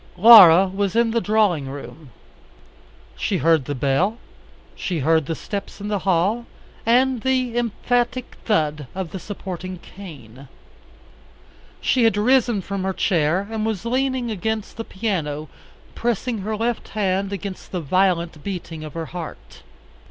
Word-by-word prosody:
Laura 190 -4 +9
was 195 +1 -2
in 235 -1 +3
the 230 0 +1
drawing 205 -11 +1
room. 145 +1 -9 1.1
She 195 - -1
heard 160 -4 +3
the 145 - -3
bell, 145 - +1 0.6
she 180 - -3
heard 160 0 +2
the 165 - -2
steps 200 +4 -6
in 205 +1 -5
the 205 -1 0
hall, 195 +6 +1 0.4
and 250 +1 +3
the 255 -2 0
emphatic 240 +2 -1
thud 150 - 0
of 185 -3 -4
the 190 - -5
supporting 185 -2 -6
cane. 140 - -12 1.3
She 255 - +2
had 225 -3 +3
risen 240 -1 +3
from 200 +1 -4
her 190 0 -1
chair 175 +1 +1
and 220 -1 -2
was 220 -1 -2
leaning 255 -1 0
against 220 +1 -3
the 225 - -5
piano, 160 -9 -3 0.4
pressing 235 0 -2
her 215 +2 -3
left 230 +1 -2
hand 195 -1 0
against 200 -1 -6
the 180 - -2
violent 170 -1 0
beating 170 -4 -6
of 155 0 -9
her 165 -1 -3
heart. 170 0 -9
195 Hz, 145 wpm, -22 LUFS, 165-225 Hz, 1.3 s, Laura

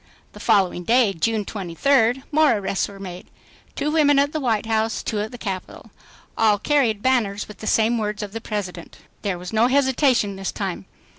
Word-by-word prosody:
The - - -13
following 185 -3 +2
day, 230 0 +3
June 215 +5 -1
23rd, 225 +7 +1
more 305 -1 +4
arrests 195 -1 -1
were 200 -1 -12
made; 180 -2 -8 0.5
two 300 - -1
women 295 -3 +4
at 285 +1 +3
the 310 - -1
White 225 -6 0
House, 220 0 0
two 215 - -2
at 210 +1 -2
the 245 - -10
Capitol. 190 -5 -6 0.4
All 215 -2 +3
carried 230 -4 +1
banners 220 -6 +1
with 210 - -12
the 215 - -7
same 225 +2 +2
words 210 0 -3
of 205 - -6
the 225 - -5
President. 190 -6 -6 0.2
There 195 -4 -2
was 180 +2 -8
no 220 +2 +4
hesitation 260 -6 +2
this 195 0 -3
time. 185 - -5
220 Hz, 190 wpm, -22 LUFS, 195-255 Hz, 0.5 s, more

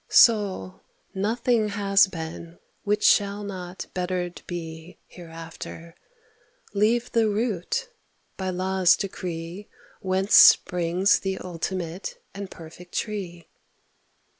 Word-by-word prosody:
Soul 205 -5 +4
— - - -42
nothing 225 +3 +1
has 200 -1 +4
been 165 -1 -7 0.3
which 210 +1 0
shall 205 0 +3
not 185 -2 -6
bettered 180 -1 -3
be 165 -1 -7
Hereafter 165 -1 -10 0.4
— - - -36 0.3
leave 225 +4 +1
the 225 -2 +3
root, 220 - -1 0.5
by 190 -1 -3
law's 185 0 +3
decree 180 0 -6 0.3
Whence 190 0 -1
springs 180 +2 +6
the 190 -1 -3
ultimate 180 0 -5
and 200 -1 -7
perfect 175 +2 -12
tree 180 -6 -4
185 Hz, 105 wpm, -25 LUFS, 175-205 Hz, 0.5 s, springs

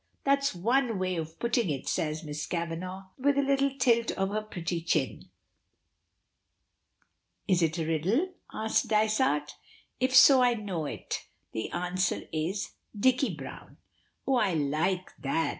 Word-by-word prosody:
That's 275 -4 +2
one 235 +4 +1
way 185 -1 -1
of 160 0 -5
putting 235 -4 +1
it," 140 -3 -3
says 155 +1 -1
Miss 150 -1 -5
Kavanagh, 180 +3 -4
with 280 +2 +2
a 280 - +3
little 275 0 +2
tilt 235 -3 +3
of 195 0 -1
her 215 +2 -1
pretty 175 -5 -4
chin. 155 -5 -1 2.2
"Is 180 -2 +3
it 160 0 +1
a 165 - -1
riddle?" 195 - 0 0.2
asks 220 0 +1
Dysart. 215 - +1 0.4
"If 255 +1 +1
so 265 0 +9
I 245 -1 +4
know 190 -8 -3
it. - - -5 0.2
The 110 - -3
answer 180 +1 -1
is 165 +6 -2 0.3
Dicky 260 +4 +3
Browne." - - -10 0.5
"Oh, 270 -2 +2
I 200 -7 +2
like 160 +6 -1
that!" 160 +3 0
190 Hz, 140 wpm, -29 LUFS, 165-245 Hz, 2.2 s, so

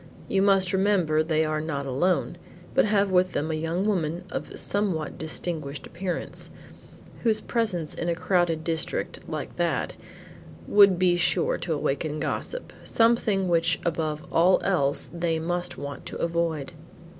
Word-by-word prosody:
You 195 - +1
must 195 -2 +4
remember 190 -6 +2
they 155 0 +1
are 155 0 -1
not 145 -3 -3
alone, 140 +8 0 0.3
but - - +4
have 200 -2 +2
with 185 0 +3
them 155 +2 -1
a - - -1
young 165 +4 -1
woman 175 -4 0
of - - -4
a - - -9
somewhat 190 -7 -1
distinguished 155 -2 -3
appearance, 180 +1 -4 0.7
whose 220 -2 +1
presence 210 -10 -1
in 170 - -3
a 170 - +1
crowded 175 -2 +1
district, 160 0 -2
like - - -5
that, - - 0 0.7
would 200 -3 +6
be 175 -1 +3
sure 175 - +2
to 170 - -2
awaken 150 +2 -2
gossip; 480 - -3
something 225 -4 +2
which 170 -1 +2
above 155 -2 -1
all 180 +3 +5
else 140 -8 +1
they 170 -1 0
must 175 +2 -2
want 140 0 -7
to - - -5
avoid." 165 -4 -1
170 Hz, 150 wpm, -26 LUFS, 155-190 Hz, 0.7 s, would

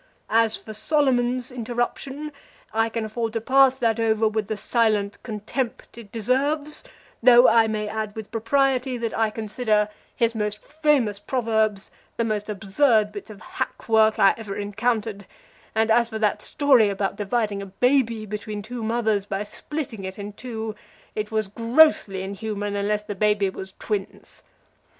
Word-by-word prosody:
As 225 -1 +3
for 220 - -10
Solomon's 255 -1 +1
interruption, 250 +5 -3 0.4
I 225 +1 +2
can 225 0 -3
afford 225 +1 -3
to 225 - 0
pass 265 +2 +4
that 230 -2 +1
over 220 -1 +2
with 215 -1 -1
the 215 -1 -3
silent 215 -2 +1
contempt 225 +3 -4
it 230 -4 -12
deserves, 280 +7 -1 0.4
though 245 +1 +8
I 225 -1 +5
may 215 -1 -2
add 215 -1 -4
with 220 -1 -8
propriety 255 +2 +1
that 230 -1 -3
I 220 -1 +2
consider 215 -1 0 0.3
his 230 -2 +1
most 210 -1 -3
famous 290 -9 +1
proverbs 220 -4 0 0.3
the 230 - +1
most 215 -2 -2
absurd 210 +2 +2
bits 205 +1 -8
of 210 -2 -11
hack - - -5
work 220 -1 +4
I 195 - +6
ever 210 -3 -6
encountered; 210 -1 -2 0.5
and 220 0 +2
as 235 0 +4
for 220 - -4
that 215 -2 +1
story 265 -7 +4
about 195 0 -2
dividing 205 -1 -1
a 200 - -7
baby 230 +1 +1
between 210 0 -5
two 240 +3 -6
mothers 220 -3 0
by 195 +1 -2
splitting 235 -1 -6
it 190 0 -6
in 205 0 -7
two, 220 -1 -5 0.4
it 210 -1 -3
was 220 -2 0
grossly 230 -3 +3
inhuman 205 +1 -4
unless 205 +1 0
the 210 - -5
baby 205 -1 +1
was 190 0 -9
twins. 205 -3 -5
220 Hz, 160 wpm, -24 LUFS, 210-240 Hz, 0.5 s, though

